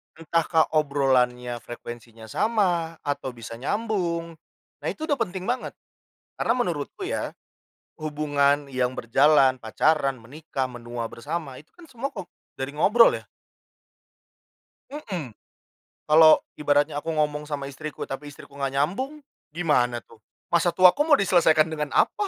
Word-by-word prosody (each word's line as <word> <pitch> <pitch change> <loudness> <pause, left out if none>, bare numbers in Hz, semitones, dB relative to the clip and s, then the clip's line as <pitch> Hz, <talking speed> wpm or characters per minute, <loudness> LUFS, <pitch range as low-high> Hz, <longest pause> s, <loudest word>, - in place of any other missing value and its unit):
Entahkah 165 0 +1
obrolannya, 125 -4 +1
frekuensinya 120 -1 -10
sama 175 - 0
atau 140 -3 -3
bisa 115 -1 -9
nyambung. 170 - -2 0.4
Nah - - -6
itu 315 +1 -5
udah 285 - +2
penting 185 -3 -3
banget, 250 +1 -2 0.7
karena - - +2
menurutku 175 - -3
ya, 380 +5 -3 0.7
hubungan 145 -1 +1
yang 125 0 -1
berjalan, 135 +1 +4
pacaran, 135 +4 +1
menikah, 135 +3 -5
menua 120 -2 -6
bersama 135 +2 -5
itu 155 - -21
kan 350 - -14
semua 270 -3 -5
kok, 190 -9 -9 0.2
dari 135 +1 -4
ngobrol 215 +10 +5
ya. - - -20 1.7
Mmm. 190 - -5 0.8
Kalau 155 +1 +7 0.2
ibaratnya 145 0 +2
aku 165 - -2
ngomong 150 -1 0
sama 145 -2 -4
istriku, 145 +2 -8
tapi 145 +2 -6
istriku 140 - -14
enggak 135 -1 -2
nyambung, 260 - -2 0.3
gimana 125 -8 +1
tuh? 115 - -19 0.3
Masa 170 0 +2
tuaku 185 +11 +5
mau 300 -2 +5
diselesaikan 165 -5 +4
dengan 150 -3 -4
apa? 415 - +2
150 Hz, 130 wpm, -25 LUFS, 135-175 Hz, 1.7 s, Kalau